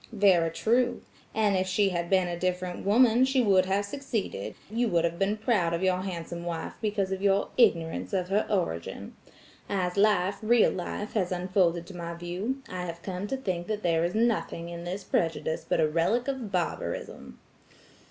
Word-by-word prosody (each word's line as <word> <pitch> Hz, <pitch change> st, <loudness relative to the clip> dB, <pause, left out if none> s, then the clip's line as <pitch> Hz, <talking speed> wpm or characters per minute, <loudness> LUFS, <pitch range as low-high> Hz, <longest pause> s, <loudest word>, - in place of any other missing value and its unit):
"Very 190 Hz, -6 st, +4 dB
true; 240 Hz, +8 st, +1 dB, 0.3 s
and 210 Hz, -2 st, +2 dB
if 185 Hz, 0 st, +1 dB
she 195 Hz, +1 st, +2 dB
had 170 Hz, -2 st, -2 dB
been 185 Hz, -2 st, +3 dB
a 175 Hz, -, -2 dB
different 180 Hz, 0 st, -2 dB
woman, 235 Hz, +4 st, +5 dB
she 265 Hz, 0 st, +2 dB
would 195 Hz, -6 st, +4 dB
have 200 Hz, +2 st, +1 dB
succeeded, 205 Hz, -, -4 dB
you 235 Hz, +3 st, 0 dB
would 170 Hz, -5 st, +2 dB
have 170 Hz, 0 st, -1 dB
been 200 Hz, +2 st, +1 dB
proud 205 Hz, -7 st, +1 dB
of 170 Hz, -, -3 dB
your 185 Hz, -1 st, +2 dB
handsome 170 Hz, -2 st, -5 dB
wife 170 Hz, -1 st, -4 dB
because 205 Hz, -3 st, -1 dB
of 190 Hz, 0 st, -2 dB
your 200 Hz, 0 st, +2 dB
ignorance 170 Hz, -9 st, +2 dB
of 185 Hz, -2 st, -1 dB
her 205 Hz, +2 st, +1 dB
origin. 85 Hz, -, -2 dB, 0.5 s
As 185 Hz, -2 st, -1 dB
life, 200 Hz, -1 st, +3 dB
real 230 Hz, +1 st, +4 dB
life, 190 Hz, +3 st, -5 dB
has 190 Hz, -5 st, 0 dB
unfolded 180 Hz, -2 st, +1 dB
to 185 Hz, -, -11 dB
my 170 Hz, -1 st, -5 dB
view, 185 Hz, +11 st, -4 dB
I 180 Hz, -1 st, -5 dB
have 170 Hz, -1 st, -7 dB
come 190 Hz, +1 st, -4 dB
to 270 Hz, -, -2 dB
think 180 Hz, -8 st, -3 dB
that 215 Hz, -1 st, -3 dB
there 165 Hz, -1 st, +2 dB
is 175 Hz, +3 st, -1 dB
nothing 220 Hz, -7 st, 0 dB
in 170 Hz, 0 st, -7 dB
this 185 Hz, +3 st, -4 dB
prejudice 165 Hz, -3 st, -1 dB
but -, -, +2 dB
a 155 Hz, -, +4 dB
relic 170 Hz, -, +1 dB
of 260 Hz, -7 st, -3 dB
barbarism." 175 Hz, -, -3 dB
185 Hz, 185 wpm, -28 LUFS, 170-210 Hz, 0.5 s, woman